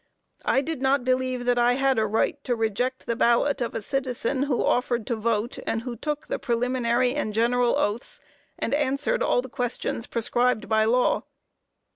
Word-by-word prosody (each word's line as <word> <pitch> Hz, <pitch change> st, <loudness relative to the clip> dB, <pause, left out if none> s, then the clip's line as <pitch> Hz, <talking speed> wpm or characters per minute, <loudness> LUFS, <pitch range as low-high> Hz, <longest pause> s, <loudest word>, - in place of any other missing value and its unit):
I 270 Hz, -, +3 dB
did 315 Hz, -1 st, -4 dB
not 265 Hz, -1 st, +2 dB
believe 255 Hz, -1 st, 0 dB
that 245 Hz, 0 st, +2 dB
I 240 Hz, +1 st, +4 dB
had 270 Hz, -1 st, +2 dB
a 215 Hz, -, +1 dB
right 225 Hz, +6 st, 0 dB
to 245 Hz, -, +1 dB
reject 230 Hz, +4 st, -1 dB
the 235 Hz, -, -1 dB
ballot 245 Hz, +4 st, +2 dB
of 240 Hz, -, -2 dB
a 225 Hz, -, -3 dB
citizen 260 Hz, +1 st, -2 dB
who 255 Hz, -, +1 dB
offered 245 Hz, -2 st, +1 dB
to 240 Hz, -, -1 dB
vote, 225 Hz, +1 st, -1 dB
and 225 Hz, 0 st, -1 dB
who 245 Hz, -1 st, -5 dB
took 295 Hz, +5 st, -4 dB
the -, -, -3 dB
preliminary 245 Hz, 0 st, +1 dB
and 215 Hz, -8 st, -2 dB
general 240 Hz, +2 st, +2 dB
oaths; 240 Hz, -, -2 dB, 0.4 s
and -, -, -2 dB
answered 290 Hz, -, 0 dB
all 245 Hz, -, +2 dB
questions 245 Hz, -2 st, -3 dB
prescribed 240 Hz, +1 st, 0 dB
by 220 Hz, 0 st, +3 dB
law. 245 Hz, +3 st, +2 dB
245 Hz, 175 wpm, -25 LUFS, 230-265 Hz, 0.4 s, I